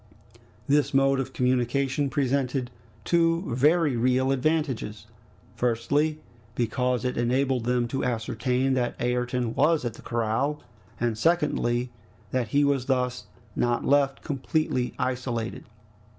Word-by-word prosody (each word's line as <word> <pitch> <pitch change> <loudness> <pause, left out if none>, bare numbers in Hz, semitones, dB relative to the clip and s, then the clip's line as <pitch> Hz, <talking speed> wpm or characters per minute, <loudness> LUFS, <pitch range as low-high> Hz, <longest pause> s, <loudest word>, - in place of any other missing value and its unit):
This 145 0 +2
mode 135 0 +4
of 135 - -3
communication 130 +3 0
presented 135 -2 0 0.3
two 165 0 +2
very 150 +1 +3
real 130 +3 +2
advantages: 135 -7 -1 0.5
firstly, 145 +6 0 0.4
because 125 +1 0
it 125 - -1
enabled 125 0 +1
them 125 -1 +1
to 135 - -2
ascertain 125 +2 0
that 125 -2 -1
Ayrton 125 -1 -1
was 150 +1 +2
at 120 - -2
the - - -13
corral; 120 +6 -1 0.4
and 120 -1 0
secondly, 125 -6 +1 0.4
that 125 -3 0
he 140 +6 +2
was 140 -3 +1
thus 125 -1 0 0.3
not 120 -1 0
left 140 -1 +2
completely 135 -2 -1
isolated. 125 -3 -3
130 Hz, 120 wpm, -26 LUFS, 120-140 Hz, 0.5 s, mode